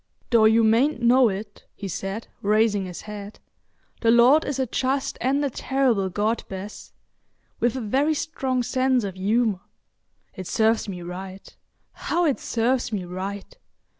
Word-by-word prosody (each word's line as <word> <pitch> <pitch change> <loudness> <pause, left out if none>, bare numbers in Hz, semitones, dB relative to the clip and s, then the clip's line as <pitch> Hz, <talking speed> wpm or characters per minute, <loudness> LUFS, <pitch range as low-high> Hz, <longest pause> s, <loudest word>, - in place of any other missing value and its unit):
"Though 230 -2 +5
you 225 +1 +5
mayn't 235 +6 +3
know 245 0 +5
it," 205 +1 -7
he 200 - -6
said, 195 +4 -5
raising 210 -1 +2
his 180 - -8
head, 210 -1 -9 0.6
"the 230 - +1
Lord 245 +7 +6
is 285 - -3
a 265 - 0
just 265 +3 -1
and 280 +3 +1
a 275 - -2
terrible 245 -8 0
God, 215 +5 -1
Bess; 195 +2 -8 0.7
with 240 +1 +1
a 260 - -3
very 275 +8 +1
strong 265 -5 -2
sense 255 0 +1
of 195 -2 -4
humour. 205 +2 +1 0.7
It 185 -2 -7
serves 220 -1 +1
me 180 -2 -6
right—how 190 - -5
it 285 -5 +1
serves 245 +1 0
me 195 -4 -3
right! 195 - -6
225 Hz, 150 wpm, -24 LUFS, 200-260 Hz, 0.7 s, Lord